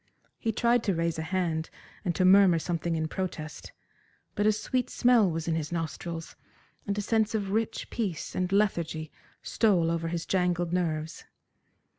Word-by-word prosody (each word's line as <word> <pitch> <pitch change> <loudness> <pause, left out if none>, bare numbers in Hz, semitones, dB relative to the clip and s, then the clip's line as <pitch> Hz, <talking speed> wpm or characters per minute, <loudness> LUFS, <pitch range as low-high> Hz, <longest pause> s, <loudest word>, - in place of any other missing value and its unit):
He 225 - 0
tried 235 +2 +2
to 195 -4 +1
raise 165 -1 -1
a - - -1
hand 165 -2 -1 0.3
and 175 -4 -1
to 185 - +2
murmur 190 -2 +7
something 170 0 -2
in 160 -1 -1
protest, 155 -4 -5 0.6
but 205 +1 +1
a - - +6
sweet 250 +4 -1
smell 240 -5 +4
was 165 -1 -3
in 165 - +1
his 160 -1 -2
nostrils, 165 0 -4 0.5
and 200 0 -1
a 205 - -1
sense 220 0 +1
of 200 -3 -2
rich 220 +1 -1
peace 195 -9 -3
and 185 0 -1
lethargy 170 -6 0 0.3
stole 180 -7 +2
over 165 0 -1
his 170 0 -3
jangled 175 -2 0
nerves. 160 -3 -2
175 Hz, 165 wpm, -28 LUFS, 165-205 Hz, 0.6 s, murmur